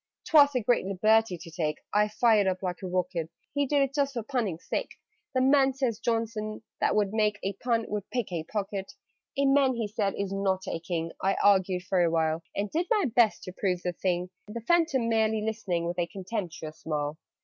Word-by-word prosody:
"'Twas 285 -3 +6
a 250 - +2
great 240 +2 +3
liberty 215 +1 +2
to 165 - -11
take!" 155 -2 -2 0.2
(I 210 +1 +4
fired 215 -2 +3
up 185 0 -1
like 180 -1 -3
a 190 - -4
rocket). 180 -2 -1 0.2
"He 285 0 +1
did 285 0 +3
it 275 0 -2
just 280 -1 0
for 235 - -2
punning's 220 - -2
sake: - - -2 0.4
'The 255 - +3
man,' 270 0 +4
says 250 -5 -1
Johnson, 225 -2 -2 0.2
'that - - +2
would 210 -1 +1
make 210 -1 +2
A 195 - -1
pun, 230 -2 +1
would 205 -1 -4
pick 245 -6 -2
a 165 -3 -2
pocket!'" 195 -1 -4 0.4
"A 280 - +3
man," 270 -2 +4
said 205 -1 -1
he, - - -1
"is 195 -1 -4
not 190 -1 0
a - - -2
King." 165 -1 -3
I 195 +1 +2
argued 190 -2 +3
for 185 -1 +1
a 170 - +4
while, 160 0 +1
And 200 0 -2
did 340 +3 0
my 415 - +2
best 235 -3 +4
to 185 - -7
prove 180 -2 -1
the 180 - -1
thing 180 0 -1 0.2
The 230 +3 -6
Phantom 315 -3 +2
merely 220 -1 +2
listening 210 -6 -2
With 175 +1 -3
a 170 - +1
contemptuous 180 -4 -5
smile. 150 -1 -3
205 Hz, 210 wpm, -28 LUFS, 180-235 Hz, 0.4 s, Twas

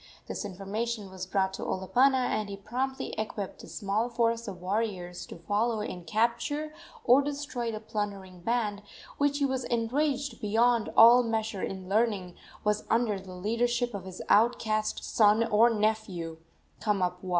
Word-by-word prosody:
This - - -4
information 205 +2 -4
was 185 -1 -6
brought 190 0 0
to - - -6
Olopana, 250 +8 +2
and 215 -3 -1
he 200 - -6
promptly 260 +6 -3
equipped 210 -2 -4
a - - -10
small 210 +3 -1
force 230 -1 0
of 190 -3 -6
warriors 185 -2 -3
to - - -9
follow 215 +6 0
and 180 -5 -6
capture 235 - 0 0.3
or 250 +3 +6
destroy 280 -4 -3
the 215 - -5
plundering 200 -4 -5
band, 210 0 -1 0.4
which, 285 0 +2
he 285 - +2
was 260 -1 -1
enraged 265 +2 -1
beyond 225 +2 +2
all 235 +2 +9
measure 220 -3 -2
in 190 -1 -5
learning, 200 -3 +1 0.3
was 210 0 +1
under 225 -3 +2
the 185 -1 -10
leadership 240 +5 0
of 195 -2 -6
his 185 -1 -7
outcast 215 -1 +2
son 215 +1 +4
or 230 +1 +5
nephew, 210 -7 -1 0.4
Kamapuaa. 185 -3 -1
215 Hz, 150 wpm, -29 LUFS, 195-235 Hz, 0.4 s, all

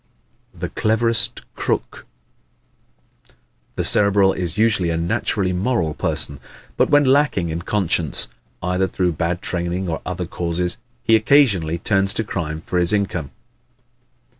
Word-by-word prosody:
The - - -6
Cleverest 115 +2 +1
Crook - - -3 1.2
¶ - - -28 0.4
The - - -1
Cerebral 100 -2 +4
is 90 -3 -3
usually 105 -5 +2
a 85 - -1
naturally 90 +3 -1
moral 90 -5 0
person. 75 -4 -1 0.4
But - - +2
when 145 0 +5
lacking 135 - +2
in 80 +2 -3
conscience, 85 -5 0 0.4
either 90 +1 0
through 90 -1 0
bad 85 +3 -2
training 90 +1 -2
or 80 -1 -3
other - - -4
causes, 90 +1 -2 0.2
he 115 - +4
occasionally 110 - +3
turns 95 +1 +2
to 110 - 0
crime 80 -6 -4
for 90 +1 -2
his 90 +3 +2
income. 90 -8 -1
90 Hz, 135 wpm, -20 LUFS, 85-105 Hz, 1.2 s, when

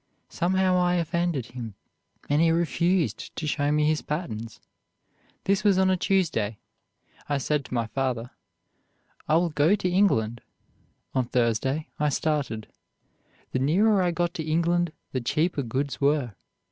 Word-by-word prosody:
Somehow 185 +1 +2
I 180 0 +2
offended 170 -5 0
him, 115 -4 -7 0.5
and 145 +2 +2
he 165 - +4
refused 170 - 0
to 160 - -4
show 145 -1 0
me 150 0 +2
his 155 0 +1
patterns. 115 -9 -5 0.8
This 195 0 +1
was 200 -3 +4
on 190 0 +4
a - - +3
Tuesday. 160 - 0 0.7
I 145 - +1
said 145 +2 0
to - - -9
my 115 -1 +1
father, 125 0 -2 1.0
'I 155 - +3
will 170 +1 +3
go 150 +6 +4
to 190 - -2
England.' 120 - +2 0.7
On 130 -2 +1
Thursday 125 +5 0
I 150 0 +2
started. 140 -7 -1 0.9
The 130 - 0
nearer 195 +9 +3
I 180 - +2
got 175 0 -1
to 165 - -4
England, 170 +2 +1 0.2
the 130 - -2
cheaper 155 +5 0
goods 135 +4 -3
were. 140 -5 +2
150 Hz, 145 wpm, -26 LUFS, 130-175 Hz, 1.0 s, he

